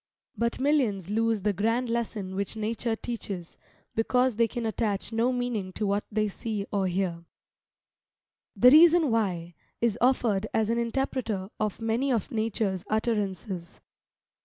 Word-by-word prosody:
But 235 Hz, +1 st, -1 dB
millions 245 Hz, -, +1 dB
lose 225 Hz, -2 st, +1 dB
the 210 Hz, -1 st, +2 dB
grand 225 Hz, +6 st, 0 dB
lesson 225 Hz, -5 st, -2 dB
which 200 Hz, +2 st, -3 dB
Nature 225 Hz, +1 st, -1 dB
teaches, 205 Hz, -7 st, -6 dB, 0.3 s
because 250 Hz, +2 st, +2 dB
they 230 Hz, +1 st, +3 dB
can 240 Hz, 0 st, -4 dB
attach 220 Hz, -1 st, -1 dB
no 230 Hz, +3 st, +2 dB
meaning 245 Hz, -6 st, -2 dB
to 215 Hz, -, -2 dB
what 200 Hz, +1 st, 0 dB
they 215 Hz, 0 st, +1 dB
see 210 Hz, 0 st, -4 dB
or 195 Hz, -2 st, +1 dB
hear. 175 Hz, -2 st, -2 dB, 1.3 s
"THE 250 Hz, -, +7 dB
REASON 325 Hz, -1 st, +7 dB
WHY" 180 Hz, -6 st, -1 dB, 0.3 s
is 235 Hz, -3 st, +1 dB
offered 230 Hz, -5 st, +2 dB
as 220 Hz, 0 st, +2 dB
an 235 Hz, -, +1 dB
interpreter 230 Hz, -5 st, -2 dB
of 215 Hz, -2 st, -1 dB
many 235 Hz, +5 st, +1 dB
of 230 Hz, -5 st, -1 dB
Nature's 215 Hz, -4 st, -1 dB
utterances. 205 Hz, -5 st, -2 dB
220 Hz, 140 wpm, -27 LUFS, 200-235 Hz, 1.3 s, THE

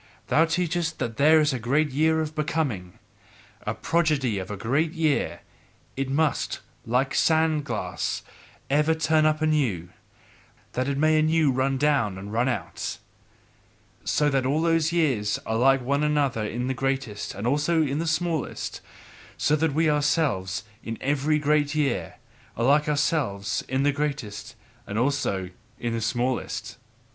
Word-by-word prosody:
Thou 160 Hz, -, +5 dB
teachest 165 Hz, 0 st, -1 dB
that 115 Hz, -2 st, -3 dB
there 155 Hz, +3 st, +6 dB
is 150 Hz, -2 st, +2 dB
a 130 Hz, -, -2 dB
great 140 Hz, +6 st, +1 dB
year 160 Hz, +3 st, +2 dB
of 155 Hz, -1 st, -4 dB
Becoming, 140 Hz, -, -2 dB, 0.7 s
a -, -, -1 dB
prodigy 150 Hz, -10 st, +1 dB
of 95 Hz, -, -6 dB
a 105 Hz, -, -4 dB
great 145 Hz, -, 0 dB
year; 155 Hz, -3 st, 0 dB, 0.5 s
it 135 Hz, 0 st, -2 dB
must, 150 Hz, +2 st, 0 dB, 0.3 s
like 130 Hz, +4 st, +1 dB
a -, -, 0 dB
sand 160 Hz, -2 st, +2 dB
glass, -, -, -3 dB, 0.4 s
ever 150 Hz, +3 st, +2 dB
turn 155 Hz, 0 st, +3 dB
up 155 Hz, 0 st, 0 dB
anew, 125 Hz, -, +1 dB, 0.8 s
that 130 Hz, +1 st, -1 dB
it 140 Hz, -1 st, -1 dB
may 155 Hz, +1 st, +4 dB
anew 155 Hz, -2 st, +3 dB
run 130 Hz, +1 st, 0 dB
down 135 Hz, -9 st, +1 dB
and 100 Hz, +2 st, -8 dB
run 120 Hz, +3 st, +2 dB
out: 120 Hz, -, -4 dB, 1.1 s
So 150 Hz, -, +1 dB
that 135 Hz, -1 st, +1 dB
all 145 Hz, +5 st, +1 dB
those 165 Hz, -1 st, +2 dB
years 130 Hz, -12 st, +1 dB
are 110 Hz, -, -1 dB
like 135 Hz, +2 st, +4 dB
one 140 Hz, +3 st, +1 dB
another 145 Hz, -6 st, +1 dB
in 120 Hz, +3 st, -3 dB
the 130 Hz, -, -1 dB
greatest 135 Hz, -5 st, -3 dB
and 100 Hz, +3 st, -5 dB
also 150 Hz, +5 st, +2 dB
in 145 Hz, 0 st, -1 dB
the 165 Hz, -, -2 dB
smallest, 160 Hz, -3 st, -2 dB, 0.6 s
so 150 Hz, -, +2 dB
that 155 Hz, -1 st, 0 dB
we 160 Hz, +1 st, +3 dB
ourselves, 145 Hz, -, +1 dB, 0.2 s
in 115 Hz, 0 st, -5 dB
every 145 Hz, +2 st, +1 dB
great 150 Hz, 0 st, +1 dB
year, 145 Hz, -5 st, -1 dB, 0.4 s
are 115 Hz, -, +1 dB
like 150 Hz, +3 st, +4 dB
ourselves 145 Hz, -, 0 dB
in 130 Hz, +1 st, +1 dB
the 145 Hz, -, +3 dB
greatest 130 Hz, -6 st, -4 dB, 0.3 s
and 100 Hz, -, -4 dB
also 115 Hz, -8 st, 0 dB, 0.3 s
in 120 Hz, -1 st, -2 dB
the 115 Hz, -, -2 dB
smallest. 120 Hz, +3 st, -2 dB
140 Hz, 155 wpm, -25 LUFS, 120-155 Hz, 1.1 s, there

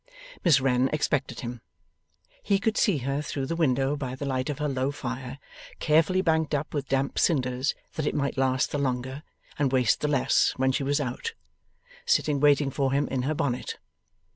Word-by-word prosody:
Miss 160 Hz, -7 st, +5 dB
Wren 130 Hz, 0 st, +2 dB
expected 145 Hz, -2 st, -1 dB
him. 120 Hz, -1 st, -6 dB, 0.8 s
He 200 Hz, -, +2 dB
could 220 Hz, +2 st, 0 dB
see 200 Hz, -8 st, +3 dB
her 140 Hz, +1 st, -1 dB
through 140 Hz, -2 st, -3 dB
the 165 Hz, -, -2 dB
window 135 Hz, -3 st, +1 dB
by 130 Hz, -3 st, -4 dB
the 140 Hz, -, -5 dB
light 130 Hz, -1 st, -1 dB
of 145 Hz, -, -2 dB
her 150 Hz, -, -1 dB
low 130 Hz, -1 st, 0 dB
fire 130 Hz, -1 st, -5 dB, 0.4 s
carefully 165 Hz, +4 st, +3 dB
banked 160 Hz, -3 st, +1 dB
up 145 Hz, +2 st, -3 dB
with 145 Hz, -2 st, -2 dB
damp 135 Hz, 0 st, 0 dB
cinders 130 Hz, -3 st, +1 dB, 0.2 s
that 155 Hz, -2 st, -2 dB
it -, -, -1 dB
might 140 Hz, -2 st, -1 dB
last 130 Hz, -1 st, +1 dB
the 145 Hz, -, -1 dB
longer 130 Hz, 0 st, -2 dB, 0.4 s
and 140 Hz, -3 st, +2 dB
waste 125 Hz, -4 st, +2 dB
the 150 Hz, -, +1 dB
less 140 Hz, -4 st, +2 dB
when 130 Hz, 0 st, +2 dB
she 130 Hz, -, -1 dB
was 140 Hz, +2 st, +1 dB
out 145 Hz, -, -4 dB, 0.7 s
sitting 155 Hz, -, +2 dB
waiting 145 Hz, -1 st, +4 dB
for 135 Hz, -1 st, 0 dB
him 140 Hz, +1 st, +1 dB
in 130 Hz, -1 st, -1 dB
her 150 Hz, +5 st, -1 dB
bonnet. 125 Hz, -4 st, -2 dB
140 Hz, 190 wpm, -27 LUFS, 130-150 Hz, 0.8 s, Miss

